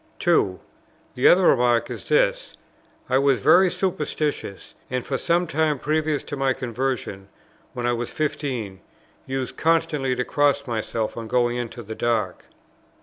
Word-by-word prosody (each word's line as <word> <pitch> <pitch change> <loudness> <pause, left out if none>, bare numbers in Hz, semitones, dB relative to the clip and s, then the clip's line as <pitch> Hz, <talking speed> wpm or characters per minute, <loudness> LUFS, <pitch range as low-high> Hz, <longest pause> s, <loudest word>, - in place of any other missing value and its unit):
2. 160 - +2 0.5
The 125 - +3
other 185 +1 +6
remark 120 -6 +3
is - - -8
this: - - +1 0.5
"I 130 - +2
was 140 -2 +3
very 185 - +5
superstitious, 150 - -3 0.2
and 125 0 -3
for 135 - -2
some 175 +1 +1
time 155 -2 0
previous 155 +1 -1
to 145 - -6
my 135 -1 +1
conversion" 120 -6 -3 0.5
[when 120 - -4
I 120 - +2
was 120 0 -3
fifteen] 130 -10 -3 0.5
"used 130 -1 -4
constantly 160 -5 +1
to 125 0 -2
cross 145 -1 +1
myself 110 -2 -3
on 115 -1 -5
going 120 +1 +1
into 120 0 -5
the 110 +1 -7
dark." 110 -5 -1
130 Hz, 145 wpm, -23 LUFS, 120-155 Hz, 0.5 s, other